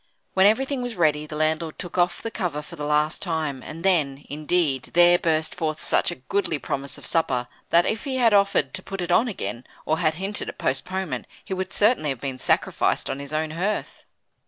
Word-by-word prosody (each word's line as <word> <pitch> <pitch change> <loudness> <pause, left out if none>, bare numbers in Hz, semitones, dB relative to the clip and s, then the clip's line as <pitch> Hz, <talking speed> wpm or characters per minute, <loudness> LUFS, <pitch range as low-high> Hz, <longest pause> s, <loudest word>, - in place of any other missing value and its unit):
When 190 +1 +6
everything 265 +5 +1
was 245 -2 -4
ready, 155 -3 +2
the 150 - -7
landlord 155 +1 0
took 175 -3 -7
off 175 -1 +1
the 225 - -3
cover 170 -9 -2
for - - -11
the 145 0 -4
last 150 +1 +1
time, 160 -7 -2
and 165 +5 -8
then, 145 -7 +2
indeed, 150 -3 0
there 175 0 +7
burst 160 -1 0
forth 155 -3 -2
such - - +2
a - - -3
goodly 165 +4 -1
promise 140 -1 -4
of - - -9
supper, 130 -7 +1 0.2
that 170 +1 +5
if 220 - -1
he 270 -2 -2
had 235 -4 +4
offered 200 0 +3
to 185 - -2
put 195 0 -5
it 175 0 -2
on 225 +8 +4
again 125 - -4 0.2
or 160 +1 +1
had 155 -3 +2
hinted 195 +4 -3
at - - -8
postponement, 185 +8 -2 0.2
he - - -4
would 190 0 -3
certainly 205 -8 +3
have 135 -3 -2
been 135 -1 -4
sacrificed - - +1
on 135 - -4
his 140 0 -8
own 155 0 -1
hearth. 190 +6 -3
165 Hz, 210 wpm, -24 LUFS, 150-190 Hz, 0.2 s, there